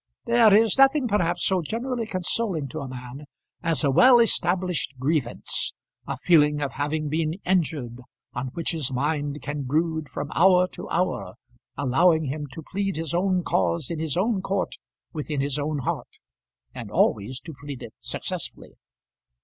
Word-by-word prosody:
There 235 -2 +5
is 220 +4 +4
nothing 270 0 +5
perhaps 175 -5 +1
so 190 -2 +2
generally 235 - -3
consoling 185 -4 -1
to 155 - -5
a 140 - -5
man 130 +3 -8 0.4
as 165 -2 +2
a 140 - +3
well 250 - +7
established 180 - +1
grievance; 135 -1 -1 0.3
a - - -3
feeling 150 -4 +4
of 145 -2 -2
having 150 +2 -2
been 155 +1 -1
injured, 150 -10 0 0.3
on 125 +2 -3
which 170 - -1
his 155 -6 -2
mind 145 +2 -2
can 145 0 -3
brood 155 +2 -1
from 145 +3 -5
hour 180 +1 +5
to - - -9
hour, 180 -8 -1 0.4
allowing 160 +5 +3
him 145 +2 -4
to 160 - -8
plead 195 +3 -2
his 160 -1 -3
own 185 0 +1
cause 170 -4 0
in 165 - -3
his 160 -1 -1
own 200 +1 +1
court, 195 0 -2 0.4
within 150 -2 -3
his 140 +1 0
own 150 +1 -1
heart, 135 - -4 0.6
and - - -7
always 125 +6 +1
to 165 - -9
plead 145 -3 -7
it - - -9
successfully. - - -6
160 Hz, 160 wpm, -25 LUFS, 145-185 Hz, 0.6 s, well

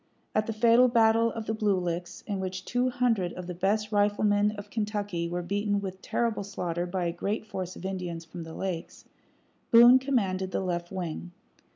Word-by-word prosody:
At 215 0 +1
the - - -1
fatal 230 +3 +5
battle 230 -1 +4
of 225 -1 -5
the 220 - -1
Blue 210 -3 +1
Licks, 175 0 -4
in 200 -3 -3
which 185 0 -4
two 245 +1 +1
hundred 230 -8 +1
of 180 - -7
the 180 - -5
best 210 +4 0
riflemen 205 0 +3
of 205 0 -9
Kentucky 205 -6 -2
were 175 +1 -3
beaten 205 +3 0
with 190 -1 -6
terrible 230 -4 -1
slaughter 175 -3 -3
by 180 0 -2
a 170 - 0
great 200 +6 -3
force 185 -3 -5
of 185 - -9
Indians 180 -3 -4
from 170 +1 -8
the 160 0 -8
lakes, 180 -4 -5 0.6
Boone 240 +2 +8
commanded 195 -9 0
the - - -2
left 175 -2 -3
wing. 175 -1 -5
200 Hz, 190 wpm, -28 LUFS, 180-220 Hz, 0.6 s, Boone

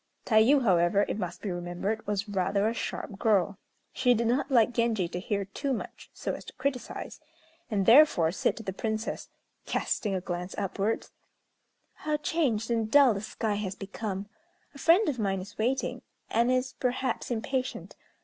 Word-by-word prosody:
Tayû, 240 +5 +5
however, 185 0 +3
it - - -3
must 180 -2 -5
be 200 - -2
remembered, 175 +5 -3
was 205 +1 -1
rather 200 +1 +1
a 225 - 0
sharp 205 -3 -5
girl. 200 -3 +2 0.3
She 250 -1 +3
did 235 +1 0
not 250 +5 +1
like 240 -3 +4
Genji 225 -6 +1
to 175 - -5
hear 200 0 -2
too 270 +8 -3
much, 235 - -7
so - - -4
as - - -7
to - - -10
criticise; 260 -1 -4 0.5
and, 200 -4 0
therefore, 230 - +6
said - - 0
to 225 - -7
the 190 - -4
Princess, 220 +2 -3 0.4
casting 205 -3 -1
a - - 0
glance 180 0 -5
upwards, 200 +2 -2 0.8
"How 305 0 -2
changed 255 -8 0
and 225 -2 0
dull 275 -1 +6
the 200 - -4
sky 215 0 -2
has 200 -2 -3
become. 200 -1 -5 0.5
A 280 - -12
friend 350 +9 +5
of 265 -5 -1
mine 195 -2 0
is 205 +4 -10
waiting; 260 +4 0 0.3
and 235 +2 +3
is, 255 0 0
perhaps, 255 +1 -1
impatient. 255 +2 -3
220 Hz, 170 wpm, -28 LUFS, 195-250 Hz, 0.8 s, therefore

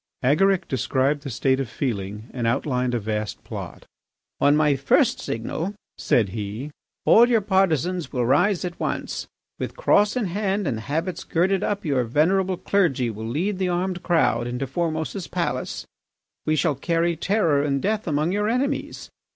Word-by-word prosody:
Agaric 185 +8 +3
described 135 +2 0
the 140 - -6
state 130 +2 +1
of 135 -4 -3
feeling 105 -4 -4
and 120 -3 -1
outlined 125 0 0
a - - 0
vast 105 0 -3
plot. - - -8 0.5
"On 145 +1 +4
my 150 -2 +3
first 135 +1 +2
signal," 160 - -3 0.2
said 110 -5 +2
he, 110 +7 -5 0.3
"all 235 +2 +7
your 235 -2 +4
partisans 185 -3 +1
will 125 -3 0
rise 175 - +2
at 175 -1 -6
once. - - -3 0.3
With - - -4
cross 210 - +3
in 250 -4 0
hand 195 +2 -1
and 120 -7 -1
habits 160 - -3
girded 190 +4 +1
up, 205 -2 -2
your 135 -5 +1
venerable 180 +9 +2
clergy 150 - +1
will 110 +1 -6
lead 180 - -1
the 185 -1 +1
armed 180 0 -1
crowd 120 -9 +2
into 125 +2 -3
Formose's 160 +5 -3
palace. - - -3 0.6
We 155 - +3
shall 150 0 +2
carry 165 +5 0
terror 165 -5 +2
and 140 -1 0
death 210 +5 -1
among 155 +2 +1
your 210 +2 0
enemies. 275 +4 -2
155 Hz, 160 wpm, -24 LUFS, 125-190 Hz, 0.6 s, all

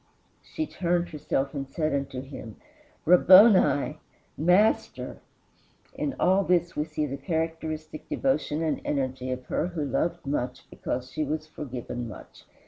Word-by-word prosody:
She 315 - -4
turned 175 - -1
herself 140 -3 -2
and 135 -2 -4
said 155 +1 -1
unto 135 -2 -2
him, 130 -5 -9 0.5
Rabboni, 180 - +6 0.4
Master!" 180 +8 +2 0.7
In 280 - -3
all 190 +2 +4
this 175 -1 +1
we 150 - 0
see 155 -1 -2
the 140 -1 -4
characteristic 160 -2 -4
devotion 215 - 0
and 155 - -1
energy 130 -2 -2
of 125 0 -4
her 170 - -1
who 170 -5 -3
loved 170 +5 -1
much 130 -2 -3
because 125 +1 -4
she 155 - -1
was 155 +1 -3
forgiven 125 -5 -6
much. 110 - -12
155 Hz, 135 wpm, -27 LUFS, 135-175 Hz, 0.7 s, Rabboni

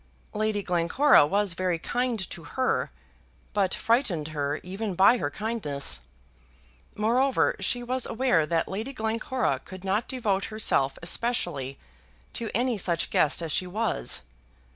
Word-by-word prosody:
Lady 215 -1 0
Glencora 175 - +4
was 200 +1 +1
very 180 0 0
kind 235 +1 -1
to 170 - -8
her, 255 - 0 0.6
but 195 -2 +1
frightened 205 - +1
her 145 -1 -2
even 195 +2 -4
by 200 +7 +6
her - - -1
kindness. 210 -11 -3 1.0
Moreover, 245 +5 +2
she 245 0 -1
was 255 +1 -1
aware 225 -10 +2
that 165 0 +1
Lady 220 +8 -4
Glencora 225 +2 -1
could 185 -1 -10
not 200 +4 0
devote 215 -7 0
herself 215 -11 +1
especially 170 - -2 0.6
to 230 -2 -3
any 245 -2 +1
such 170 -3 0
guest 155 +3 +2
as 160 - -2
she 185 - 0
was. 215 - -1
205 Hz, 135 wpm, -27 LUFS, 170-235 Hz, 1.0 s, by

